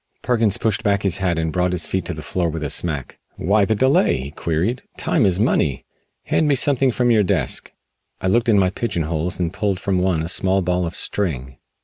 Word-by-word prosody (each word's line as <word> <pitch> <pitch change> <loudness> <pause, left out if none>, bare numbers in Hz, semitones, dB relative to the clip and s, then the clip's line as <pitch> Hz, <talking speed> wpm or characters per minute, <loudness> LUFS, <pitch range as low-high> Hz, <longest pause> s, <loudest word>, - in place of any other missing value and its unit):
Perkins 115 -5 +2
pushed 110 -3 0
back 100 -1 +1
his 95 -3 +2
hat 90 -3 0
and 80 -1 -1
brought 90 0 +1
his 85 -2 -2
feet 95 -2 -2
to 90 - -3
the 75 - -8
floor 85 +2 -1
with 80 0 -4
a 70 - -2
smack. 75 -5 -2 0.2
"Why 100 +4 +2
the 110 - +1
delay?" 130 +6 +3
he 65 +2 -6
queried, 85 - -1 0.2
"time - - +2
is 90 0 0
money. 80 - +1 0.4
Hand 155 - +1
me 145 - +3
something 135 0 +2
from 120 0 +1
your 110 -2 +4
desk." 90 -10 -1 0.5
I - - -6
looked 115 +5 +2
in 105 - +5
my 95 -2 +3
pigeonholes 85 -6 -2
and 85 -1 -1
pulled 100 -2 -1
from 95 -2 0
one 90 -3 +1
a - - -3
small 95 +2 +1
ball 90 0 0
of 85 - -6
string. 65 -10 -3
90 Hz, 220 wpm, -21 LUFS, 80-105 Hz, 0.5 s, in